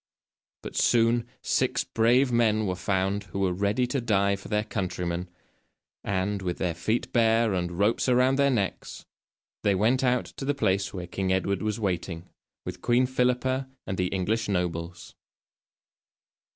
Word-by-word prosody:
But - - -7
soon 120 0 +3 0.2
six - - +1
brave 125 +4 +3
men 110 -2 +2
were 95 - 0
found 95 +2 -1
who 95 +2 -5
were 95 -2 +1
ready 100 +6 +1
to 125 +2 -2
die 100 -4 +2
for 100 - -11
their 105 0 0
countrymen, 90 -4 -3 0.7
and, 100 +1 -1
with 90 -2 -3
their 90 -3 -1
feet 110 +8 -2
bare 115 -2 +3
and 90 -1 -2
ropes 105 +6 +2
around 125 +2 +3
their 140 0 +4
necks, 105 -8 -2 0.6
they 100 - +2
went 115 +7 +2
out 125 -1 +2
to - - -9
the 145 +1 0
place 95 -6 0
where 90 -3 -5
King 95 +2 -2
Edward 95 +1 0
was 110 0 -2
waiting, 90 -3 -3 0.4
with 90 0 -6
Queen 125 +1 +3
Philippa 130 +1 0 0.2
and 95 - -3
the 90 - +1
English 105 +5 -1
nobles. 90 -2 -3
100 Hz, 155 wpm, -27 LUFS, 95-120 Hz, 0.7 s, their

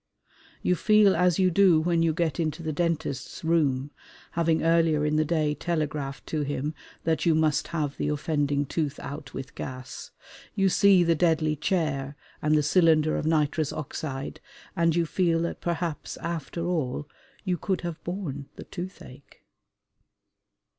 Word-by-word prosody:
You 180 - +3
feel 210 +2 +4
as 180 -1 +3
you 185 -1 +3
do 180 -2 +5
when 170 +1 +1
you 165 -1 +3
get 160 -2 -1
into 160 0 -2
the 155 -1 -2
dentist's 160 -6 -2
room, 145 -4 +1 0.4
having 165 -1 +1
earlier 165 -2 +3
in 150 0 +1
the 155 - +3
day 155 -1 +1
telegraphed 150 -3 -3
to 155 - -2
him 145 +1 -2 0.3
that 160 +1 0
you 165 - +5
must 155 -2 +2
have 150 -4 -2
the 150 - -1
offending 145 -1 0
tooth 150 0 -2
out 140 -1 -8
with 135 +1 -6
gas. 130 0 -7 0.5
You 195 -1 +3
see 195 -1 +5
the 165 -1 +3
deadly 160 -2 +2
chair 150 -4 -1 0.3
and 155 0 +3
the 150 - +2
cylinder 155 -1 +4
of 155 - -2
nitrous 155 -1 +1
oxide 140 -2 -5 0.3
and 165 -1 +2
you 170 -1 +2
feel 165 0 +1
that 170 - -4
perhaps 170 -2 -3
after 170 0 -4
all 150 -5 -2 0.4
you 180 -4 -1
could 190 +3 -1
have 170 -2 -5
borne 160 -7 -4
the - - -8
toothache. 175 -7 -10
160 Hz, 155 wpm, -27 LUFS, 145-170 Hz, 0.5 s, do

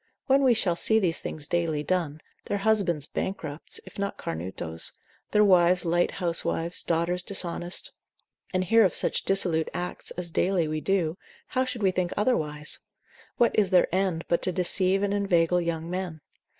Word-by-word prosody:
When 270 0 +4
we 255 -3 +4
shall 185 -6 +1
see 220 +5 +3
these 180 -6 +1
things 150 -2 -5
daily 165 -4 0
done, 160 -2 -1 0.2
their 205 - -1
husbands 195 -8 +1
bankrupts, 155 -4 -4
if - - -11
not 200 0 -2
cornutos, 80 -1 -5 0.4
their 210 - +4
wives 180 -1 +4
light 175 +1 +2
housewives, 170 -1 0
daughters 170 +2 0
dishonest; 175 -2 -2 0.6
and 185 0 +1
hear 225 +5 +5
of 190 - +2
such - - +1
dissolute 175 -5 +1
acts, 180 0 -4
as 175 -1 -5
daily 180 -1 +1
we 155 0 -2
do, 180 -2 0 0.3
how 260 0 +1
should 250 -4 -4
we 190 - +4
think 180 -1 -1
otherwise? 150 -10 0 0.6
what 240 -2 +4
is 205 -3 +2
their 180 -2 +3
end, 185 -3 0
but 170 - +1
to 185 - -1
deceive 185 +2 +2
and 200 0 0
inveigle 180 -3 +2
young 165 -1 -3
men? 180 -3 -4
180 Hz, 165 wpm, -27 LUFS, 165-195 Hz, 0.6 s, hear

